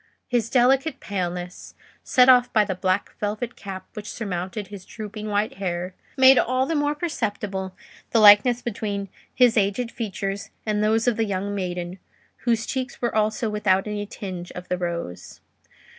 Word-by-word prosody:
His 235 Hz, -3 st, 0 dB
delicate 265 Hz, +4 st, +3 dB
paleness, 180 Hz, -2 st, -5 dB, 0.3 s
set 250 Hz, 0 st, +4 dB
off 250 Hz, -1 st, +6 dB
by 215 Hz, -2 st, +4 dB
the 190 Hz, -, -2 dB
black 185 Hz, +1 st, -1 dB
velvet 215 Hz, +4 st, -3 dB
cap 190 Hz, -1 st, -7 dB
which 210 Hz, -2 st, -7 dB
surmounted 190 Hz, -1 st, -4 dB
his 200 Hz, -2 st, -9 dB
drooping 215 Hz, +1 st, -7 dB
white 205 Hz, 0 st, -1 dB
hair, 180 Hz, -1 st, -3 dB, 0.2 s
made 260 Hz, 0 st, +8 dB
all 255 Hz, +1 st, +1 dB
the 330 Hz, -, -2 dB
more 290 Hz, -1 st, +1 dB
perceptible 205 Hz, -, -3 dB, 0.3 s
the 230 Hz, -, +3 dB
likeness 215 Hz, +4 st, +7 dB
between 200 Hz, -3 st, -3 dB, 0.2 s
his 245 Hz, -3 st, +4 dB
aged 210 Hz, +4 st, +1 dB
features 200 Hz, -3 st, -4 dB, 0.2 s
and 210 Hz, -1 st, 0 dB
those 220 Hz, +2 st, +2 dB
of 240 Hz, -, +2 dB
the 225 Hz, -, +1 dB
young 200 Hz, 0 st, -2 dB
maiden, 180 Hz, -1 st, -4 dB, 0.5 s
whose 230 Hz, -2 st, +2 dB
cheeks 260 Hz, -1 st, -4 dB
were 240 Hz, -2 st, -1 dB
also 215 Hz, +1 st, +1 dB
without 205 Hz, -3 st, +1 dB
any 205 Hz, -1 st, -4 dB
tinge 185 Hz, -4 st, -7 dB
of 180 Hz, 0 st, -9 dB
the 180 Hz, -, 0 dB
rose. 170 Hz, -, -5 dB
210 Hz, 160 wpm, -24 LUFS, 190-235 Hz, 0.5 s, made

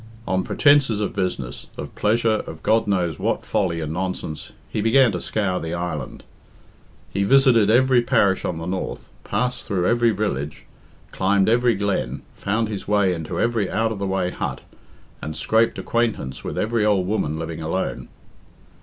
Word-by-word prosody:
On 95 Hz, 0 st, +1 dB
pretences 140 Hz, -7 st, +3 dB
of 105 Hz, -, -2 dB
business, 90 Hz, -11 st, -3 dB
of -, -, -7 dB
pleasure, 110 Hz, +1 st, +2 dB
of 80 Hz, 0 st, -9 dB
God 110 Hz, 0 st, +2 dB
knows 90 Hz, -6 st, 0 dB
what -, -, -1 dB
folly 85 Hz, -4 st, 0 dB
and 80 Hz, 0 st, -3 dB
nonsense, 90 Hz, -4 st, -4 dB, 0.2 s
he 105 Hz, -, -3 dB
began 120 Hz, +2 st, +5 dB
to 90 Hz, -3 st, -4 dB
scour 95 Hz, -4 st, -1 dB
the 80 Hz, +1 st, -4 dB
island. 85 Hz, -5 st, -4 dB, 0.9 s
He 100 Hz, -, +1 dB
visited 125 Hz, -2 st, +5 dB
every 125 Hz, +2 st, +5 dB
parish 100 Hz, -5 st, +2 dB
on 85 Hz, -, -2 dB
the 80 Hz, -, -5 dB
north, 90 Hz, +1 st, -4 dB
passed 125 Hz, 0 st, -1 dB
through 90 Hz, -3 st, -1 dB
every 120 Hz, 0 st, +3 dB
village, 95 Hz, -, -3 dB, 0.5 s
climbed 95 Hz, +1 st, +2 dB
every 120 Hz, 0 st, +3 dB
glen, 95 Hz, -10 st, -2 dB
found 110 Hz, +3 st, -1 dB
his 105 Hz, -3 st, -6 dB
way 100 Hz, -3 st, +3 dB
into 85 Hz, +1 st, -4 dB
every 115 Hz, -5 st, +1 dB
out 115 Hz, 0 st, 0 dB
of 105 Hz, -, -4 dB
the 100 Hz, -, -2 dB
way 95 Hz, -1 st, 0 dB
hut, -, -, -4 dB, 0.6 s
and 80 Hz, 0 st, -5 dB
scraped 115 Hz, +1 st, +2 dB
acquaintance 115 Hz, -, -1 dB
with -, -, -5 dB
every 110 Hz, 0 st, +1 dB
old 100 Hz, -3 st, +2 dB
woman 90 Hz, -6 st, -1 dB
living 80 Hz, 0 st, -5 dB
alone. 80 Hz, +4 st, -3 dB
100 Hz, 165 wpm, -22 LUFS, 85-115 Hz, 0.9 s, began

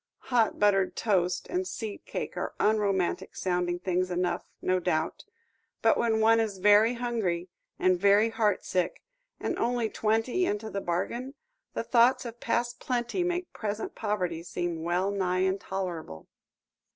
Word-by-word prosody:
Hot 230 Hz, -3 st, +3 dB
buttered 195 Hz, -2 st, +3 dB
toast 180 Hz, -5 st, +1 dB
and 365 Hz, +1 st, -2 dB
seed 220 Hz, -4 st, -6 dB
cake -, -, -4 dB
are -, -, -4 dB
unromantic 200 Hz, -4 st, +1 dB
sounding 180 Hz, -1 st, 0 dB
things 180 Hz, 0 st, -1 dB
enough, 180 Hz, 0 st, -1 dB
no 185 Hz, 0 st, +1 dB
doubt, 170 Hz, -2 st, -1 dB, 0.6 s
but -, -, +5 dB
when 225 Hz, -2 st, +1 dB
one 225 Hz, +1 st, +5 dB
is 215 Hz, -3 st, -1 dB
very 210 Hz, +5 st, +5 dB
hungry, 215 Hz, -8 st, -2 dB, 0.3 s
and 185 Hz, -1 st, +3 dB
very 205 Hz, +3 st, +5 dB
heartsick, 210 Hz, -5 st, 0 dB, 0.4 s
and -, -, -2 dB
only 235 Hz, -1 st, +1 dB
twenty 225 Hz, +10 st, +1 dB
into 220 Hz, -, -1 dB
the 200 Hz, -, -3 dB
bargain, 240 Hz, +11 st, -3 dB, 0.4 s
the -, -, -1 dB
thoughts 250 Hz, +2 st, +4 dB
of 235 Hz, 0 st, -7 dB
past 240 Hz, +1 st, -1 dB
plenty 250 Hz, +6 st, -1 dB
make 355 Hz, 0 st, -2 dB
present 210 Hz, 0 st, -4 dB
poverty 185 Hz, -6 st, -2 dB
seem 175 Hz, -1 st, -3 dB
well 175 Hz, +4 st, 0 dB
nigh 185 Hz, -2 st, 0 dB
intolerable. 185 Hz, -, -3 dB
205 Hz, 140 wpm, -28 LUFS, 180-230 Hz, 0.6 s, but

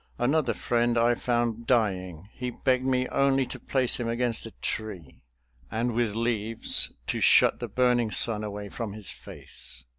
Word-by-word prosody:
Another 140 Hz, +5 st, +1 dB
friend 120 Hz, 0 st, +1 dB
I 120 Hz, +1 st, +4 dB
found 120 Hz, -1 st, -1 dB
dying. 95 Hz, -7 st, 0 dB
He 125 Hz, 0 st, -4 dB
begged 130 Hz, +1 st, 0 dB
me 130 Hz, -1 st, +1 dB
only 135 Hz, -1 st, +2 dB
to -, -, -8 dB
place 130 Hz, -2 st, +1 dB
him 120 Hz, -, -2 dB
against 115 Hz, -1 st, 0 dB
a -, -, -10 dB
tree, 95 Hz, -11 st, -5 dB, 0.5 s
and 120 Hz, +2 st, -1 dB
with 115 Hz, -3 st, 0 dB
leaves 115 Hz, -1 st, +1 dB
to -, -, -2 dB
shut -, -, +5 dB
the -, -, -4 dB
burning 125 Hz, -2 st, +2 dB
sun 105 Hz, 0 st, +2 dB
away 105 Hz, -1 st, -5 dB
from 110 Hz, -2 st, -5 dB
his 105 Hz, -4 st, -6 dB
face. -, -, -9 dB
115 Hz, 160 wpm, -27 LUFS, 110-125 Hz, 0.5 s, shut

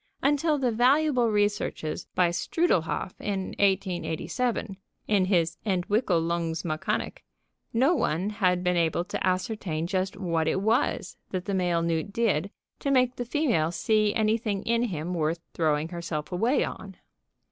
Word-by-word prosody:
Until 295 Hz, +2 st, +2 dB
the 255 Hz, -3 st, +1 dB
valuable 255 Hz, +1 st, +3 dB
researches 205 Hz, -6 st, -1 dB
by 180 Hz, -2 st, +4 dB
Strudlehoff 180 Hz, -, 0 dB
in 195 Hz, -2 st, -2 dB
1887 195 Hz, -, 0 dB, 0.3 s
(in 200 Hz, -3 st, +3 dB
his 170 Hz, -3 st, +1 dB
"Entwickelungsmechanik") 170 Hz, -5 st, 0 dB, 0.5 s
no 265 Hz, +9 st, +3 dB
one 185 Hz, -, 0 dB
had 180 Hz, -3 st, +1 dB
been 180 Hz, 0 st, +2 dB
able 170 Hz, +1 st, +1 dB
to -, -, -4 dB
ascertain 185 Hz, -3 st, -1 dB
just 185 Hz, +2 st, -1 dB
what 165 Hz, -5 st, 0 dB
it 185 Hz, -, +1 dB
was 225 Hz, +7 st, 0 dB
that 185 Hz, -1 st, -3 dB
the 200 Hz, -, -2 dB
male 175 Hz, -3 st, +1 dB
newt 165 Hz, +3 st, -1 dB
did 200 Hz, -5 st, +1 dB, 0.3 s
to 280 Hz, -, -2 dB
make 255 Hz, -2 st, +3 dB
the 245 Hz, -, -3 dB
female 235 Hz, -, +1 dB
see 215 Hz, +3 st, +2 dB
anything 215 Hz, -2 st, 0 dB
in 235 Hz, +1 st, +1 dB
him 175 Hz, -4 st, -3 dB
worth 165 Hz, 0 st, -1 dB
throwing 155 Hz, -1 st, +1 dB
herself 170 Hz, -3 st, -4 dB
away 230 Hz, +10 st, +2 dB
on. -, -, -7 dB
190 Hz, 135 wpm, -27 LUFS, 170-230 Hz, 0.5 s, by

